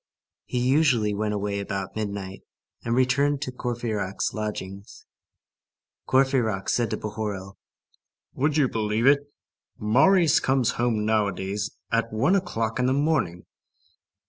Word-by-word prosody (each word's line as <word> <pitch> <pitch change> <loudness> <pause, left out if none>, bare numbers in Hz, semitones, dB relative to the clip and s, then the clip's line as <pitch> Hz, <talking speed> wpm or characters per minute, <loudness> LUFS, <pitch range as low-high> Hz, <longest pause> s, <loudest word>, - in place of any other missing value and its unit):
He 125 - -4
usually 130 -7 +3
went 105 +1 -1
away 100 0 -2
about 100 -1 -4
midnight, 100 -3 -4 0.4
and 115 0 0
returned 140 +3 +2
to 130 - -4
Courfeyrac's 115 -6 -3
lodgings. 100 -2 -6 1.0
Courfeyrac 130 -7 +2
said 120 -3 +1
to - - -2
Bahorel:— 105 -3 -5 0.7
"Would 145 +3 0
you 145 -4 +4
believe 110 0 -1
it? 145 +1 +3 0.5
Marius 160 - +4
comes 130 -5 +1
home 115 -3 0
nowadays 100 -2 -1
at 115 0 0
one 135 - +2
o'clock 115 - -1
in 125 - +2
the 130 - +2
morning." 140 - 0
115 Hz, 120 wpm, -25 LUFS, 105-135 Hz, 1.0 s, you